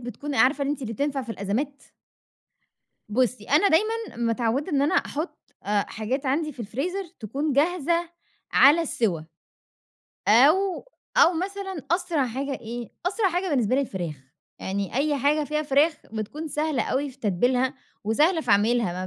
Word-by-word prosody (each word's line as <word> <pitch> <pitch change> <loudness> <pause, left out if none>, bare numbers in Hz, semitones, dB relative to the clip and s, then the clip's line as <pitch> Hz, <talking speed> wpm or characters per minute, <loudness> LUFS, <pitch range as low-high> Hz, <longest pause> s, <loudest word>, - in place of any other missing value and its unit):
بتكون 250 +4 -6
عارفة 275 +2 +3
أنتِ 280 -1 -2
اللي 225 -2 -4
بتنفع 280 +3 -1
في 240 - -8
الأزمات؟ 250 +9 -3 1.3
بُصّي، 245 0 0
أنا 305 - +4
دايمًا 440 - +1
متعوّدة 235 +6 0
إن 280 -1 +3
أنا 305 +6 +2
أحُط 315 -1 -2 0.2
أ 205 0 +1
حاجات 255 +6 -3
عندي 305 +3 0
في 250 - -11
الفريزر 295 - -3 0.2
تكون 280 +8 -2
جاهزة 335 +3 +1 0.4
على 295 +5 +7
السِوا. 220 - 0 1.1
أو 330 - +4 0.3
أو 345 - +7
مثلًا 380 -1 -4
أسرع 335 -6 +1
حاجة 270 +4 -3
إيه؟ 235 0 -6 0.2
أسرع 390 +1 +2
حاجة 360 +2 -1
بالنسبة 250 -5 +2
لي 275 - +3
الفراخ. 180 - -4 0.5
يعني 195 0 -3
أي 290 +3 +1
حاجة 295 +3 +2
فيها 305 +1 -1
فراخ 295 +3 +3 0.2
بتكون 285 +9 -5
سهلة 300 -4 0
أوي 280 +5 -1
في 260 - -19
تتبيلها 250 +5 +1 0.3
وسهلة 310 - +3
في 245 - -3
عميلها، 200 -3 +2
275 Hz, 150 wpm, -25 LUFS, 235-315 Hz, 1.3 s, على